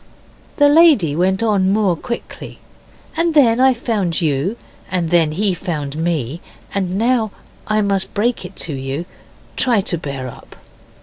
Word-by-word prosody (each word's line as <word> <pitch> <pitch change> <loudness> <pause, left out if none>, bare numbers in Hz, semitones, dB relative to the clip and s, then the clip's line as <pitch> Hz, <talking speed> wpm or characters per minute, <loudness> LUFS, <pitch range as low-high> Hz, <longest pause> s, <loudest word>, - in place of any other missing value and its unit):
The 290 - +6
lady 285 - +5
went 190 +5 +1
on 200 -4 +2
more 200 -4 +2
quickly, 235 +8 -7 0.6
'And 330 0 0
then 245 -5 +5
I 260 0 +5
found 205 -8 -1
you, 160 - -1 0.3
and 175 -3 -1
then 165 -3 +3
he 195 +3 +1
found 155 -6 -4
me, 160 -2 -2 0.3
and 190 -2 -1
now 230 0 +2 0.4
I 215 0 +2
must 200 -2 -1
break 230 +2 0
it 180 - -9
to 155 - -5
you. 135 +4 -4 0.5
Try 240 -4 +2
to 185 -4 -3
bear 135 -4 -5
up. 125 - -12
190 Hz, 150 wpm, -18 LUFS, 165-230 Hz, 0.6 s, The